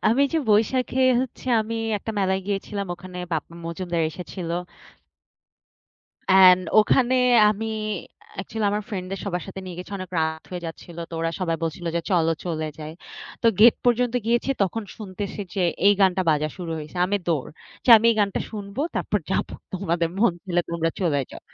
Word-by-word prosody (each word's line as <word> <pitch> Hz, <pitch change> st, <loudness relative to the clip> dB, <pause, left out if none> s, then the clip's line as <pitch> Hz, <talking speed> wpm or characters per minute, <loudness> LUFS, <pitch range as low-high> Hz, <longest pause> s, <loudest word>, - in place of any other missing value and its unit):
আমি 265 Hz, +5 st, +3 dB
যে 325 Hz, -, +2 dB
বৈশাখে 250 Hz, +5 st, +2 dB, 0.2 s
হচ্ছে 260 Hz, 0 st, -6 dB
আমি 225 Hz, +1 st, -3 dB, 0.2 s
একটা 225 Hz, -, -5 dB
মেলায় 190 Hz, -1 st, +1 dB
গিয়েছিলাম, 200 Hz, 0 st, -3 dB
ওখানে 180 Hz, +1 st, -10 dB
বাপ্পা 165 Hz, +1 st, -3 dB
মজুমদার 170 Hz, 0 st, -2 dB
এসেছিল। 180 Hz, 0 st, -7 dB, 1.8 s
অ্যান্ড 185 Hz, -1 st, +8 dB, 0.2 s
ওখানে 250 Hz, +4 st, +3 dB, 0.4 s
আমি 215 Hz, +1 st, -3 dB, 0.7 s
অ্যাকচুয়ালি 215 Hz, +2 st, -2 dB
আমার 210 Hz, +1 st, -1 dB
ফ্রেন্ডদের 190 Hz, -2 st, -5 dB
সবার 180 Hz, -3 st, -2 dB
সাথে 195 Hz, 0 st, -7 dB
নিয়ে 180 Hz, -2 st, -7 dB
গেছি 180 Hz, +3 st, -8 dB
অনেক 185 Hz, -1 st, -7 dB
রাত 160 Hz, 0 st, -1 dB
হয়ে 180 Hz, -1 st, -5 dB
যাচ্ছিল 165 Hz, +1 st, -9 dB
তো -, -, -16 dB
ওরা 165 Hz, 0 st, 0 dB
সবাই 165 Hz, -3 st, 0 dB
বলছিল 165 Hz, +2 st, -3 dB
যে, -, -, +1 dB
"চল, 170 Hz, -3 st, +3 dB, 0.2 s
চলে 160 Hz, -3 st, -2 dB
যাই।" 155 Hz, 0 st, -7 dB, 0.5 s
তো -, -, +3 dB
গেট 230 Hz, +1 st, +8 dB
পর্যন্ত 245 Hz, 0 st, +2 dB
গিয়েছি 240 Hz, +3 st, +1 dB
তখন 195 Hz, +4 st, -1 dB
শুনতেছি 205 Hz, -1 st, -6 dB
যে 190 Hz, -, 0 dB, 0.2 s
এই 205 Hz, -, +8 dB
গানটা 190 Hz, -1 st, +4 dB
বাজা 155 Hz, 0 st, +1 dB
শুরু 175 Hz, -3 st, -5 dB
হইছে, 155 Hz, +3 st, -9 dB
আমি 200 Hz, +2 st, +1 dB
দৌড়। 155 Hz, -6 st, 0 dB, 0.4 s
যে, -, -, +3 dB
"আমি 225 Hz, +1 st, +2 dB
এই 230 Hz, -, 0 dB
গানটা 200 Hz, -2 st, 0 dB
শুনবো 205 Hz, +2 st, -6 dB, 0.2 s
তারপর 210 Hz, -, 0 dB
যাব, -, -, +1 dB, 0.3 s
তোমাদের 170 Hz, -3 st, 0 dB
মন 220 Hz, -3 st, +4 dB
চাইলে 175 Hz, -3 st, 0 dB
তোমরা 165 Hz, -1 st, 0 dB
চলে 155 Hz, -6 st, +1 dB
যাও।" -, -, -9 dB
190 Hz, 170 wpm, -24 LUFS, 170-210 Hz, 1.8 s, অ্যান্ড